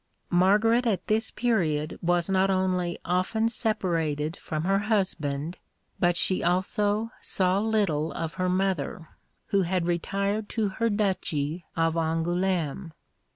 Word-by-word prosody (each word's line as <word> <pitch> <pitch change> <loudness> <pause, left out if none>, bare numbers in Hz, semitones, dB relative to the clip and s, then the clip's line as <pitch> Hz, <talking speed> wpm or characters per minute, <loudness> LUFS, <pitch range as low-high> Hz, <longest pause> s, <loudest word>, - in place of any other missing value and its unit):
Margaret 210 +7 +4
at 205 -5 0
this 220 +1 +1
period 160 -11 0
was 175 0 +1
not 190 0 +2
only 185 -2 0
often 185 +6 +1
separated 170 - -1
from 155 0 -4
her 195 +2 +2
husband, 175 -7 -1 0.4
but 175 -1 +3
she 185 - +1
also 205 +5 +1
saw 185 0 +1
little 200 -8 +1
of 165 -1 -4
her 185 -1 -1
mother, 180 -4 -1 0.4
who 200 - +3
had 180 -1 0
retired 200 +5 -1
to 220 -3 0
her 230 +4 0
duchy 180 -6 -1
of 165 -1 +2
Angoulême. 165 +1 -1
185 Hz, 125 wpm, -27 LUFS, 165-205 Hz, 0.4 s, Margaret